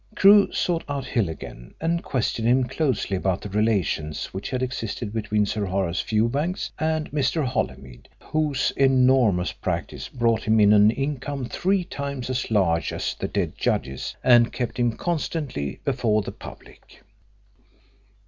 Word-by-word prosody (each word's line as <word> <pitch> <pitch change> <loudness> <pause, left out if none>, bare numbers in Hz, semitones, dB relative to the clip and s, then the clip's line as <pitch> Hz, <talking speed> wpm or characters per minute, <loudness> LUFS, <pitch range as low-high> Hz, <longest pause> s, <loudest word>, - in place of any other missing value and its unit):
Crewe 200 -1 +6
sought 170 -2 0
out 140 -2 -3
Hill 110 -8 0
again - - -9
and 170 +1 -1
questioned 115 -2 -1
him 130 +2 +4
closely 130 -6 -1
about 95 -1 -1
the 100 - -6
relations 100 -7 0
which 95 +2 -5
had 130 -1 -2
existed 115 -3 -4
between 105 -1 0
Sir 105 0 -2
Horace 95 -2 -1
Fewbanks 135 - -1
and 155 0 -1
Mr. 145 +1 0
Holymead, 65 - -4
whose 150 -3 -1
enormous 130 -9 +3
practice - - -4
brought 115 -2 +1
him 110 0 +4
in 105 0 +6
an 105 0 +6
income 135 +1 -3
three 190 +8 0
times 140 -5 -5
as 130 0 -2
large 95 -7 +1
as - - -2
the - - -4
dead - - -2
judge's, 65 0 -2
and 120 -2 +5
kept 125 0 -4
him 120 -1 +2
constantly 150 - -3
before 120 -6 +1
the - - -5
public. - - -14
120 Hz, 150 wpm, -24 LUFS, 100-140 Hz, -, Crewe